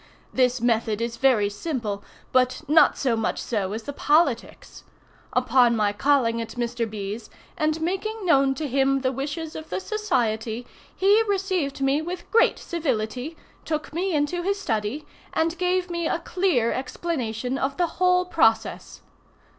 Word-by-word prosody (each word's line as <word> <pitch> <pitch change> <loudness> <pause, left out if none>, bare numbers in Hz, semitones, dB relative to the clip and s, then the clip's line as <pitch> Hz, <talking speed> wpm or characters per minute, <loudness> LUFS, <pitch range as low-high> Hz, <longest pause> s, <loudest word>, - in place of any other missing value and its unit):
This 255 -1 +2
method 225 -2 +1
is 235 0 -3
very 230 -5 +3
simple, 210 -2 -4 0.3
but 255 +3 +2
not 310 +3 +5
so 250 -4 +1
much 225 - -1
so 200 -5 -2
as 220 +2 -4
the 285 - -5
politics. 290 -5 0 0.5
Upon 250 -1 +4
my 210 -2 +1
calling 230 -1 +2
at 230 +1 -7
Mr. 240 -1 -2
B.'s, 210 +1 -6 0.3
and 310 +1 0
making 390 +5 -2
known 275 -5 +4
to 300 +2 -3
him 270 +1 +2
the 260 -1 +1
wishes 290 +4 -4
of 315 - -8
the - - -2
society, 245 - -1 0.3
he 405 +3 +4
received 370 -8 -1
me 275 +2 +2
with 350 +2 -6
great 460 - +4
civility, 260 -2 -3 0.3
took 305 -1 -3
me 355 +1 -1
into 295 +4 0
his 395 +3 -1
study, 225 - -2 0.3
and 325 +1 +1
gave 360 0 0
me 340 -1 -1
a - - 0
clear 335 -9 +1
explanation 255 -3 -3
of 270 +1 -1
the 355 - +3 0.2
whole 360 0 +4
process. 225 -11 +1
270 Hz, 155 wpm, -24 LUFS, 230-335 Hz, 0.5 s, not